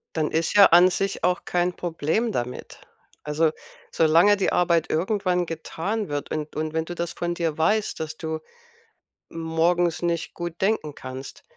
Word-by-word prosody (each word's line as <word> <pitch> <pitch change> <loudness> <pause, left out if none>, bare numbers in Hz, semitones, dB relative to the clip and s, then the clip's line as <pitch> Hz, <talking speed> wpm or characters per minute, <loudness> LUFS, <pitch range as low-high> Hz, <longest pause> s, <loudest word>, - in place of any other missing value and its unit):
Dann 155 -2 0
ist 165 +5 0
ja 200 - +9
an 175 +2 +7
sich 195 -2 -2
auch 180 0 +1
kein 180 0 0
Problem 175 +7 -1
damit. 125 - -5 0.4
Also, 155 +1 +1 0.4
solange 170 +6 +4
die 195 - +1
Arbeit 170 -2 +2
irgendwann 180 +1 0
getan 170 +6 -4
wird 145 -1 -3
und 155 -1 -4
und 155 0 -3
wenn 160 0 -1
du 175 - -6
das 170 0 -3
von 175 0 -2
dir 165 -3 -2
weißt, 210 +7 +1
dass 155 0 -5
du 160 0 -4 0.9
morgens 165 +1 0
nicht 170 -1 -2
gut 175 -1 -6
denken 190 -8 0
kannst, 130 +1 -9
170 Hz, 160 wpm, -24 LUFS, 160-180 Hz, 0.9 s, ja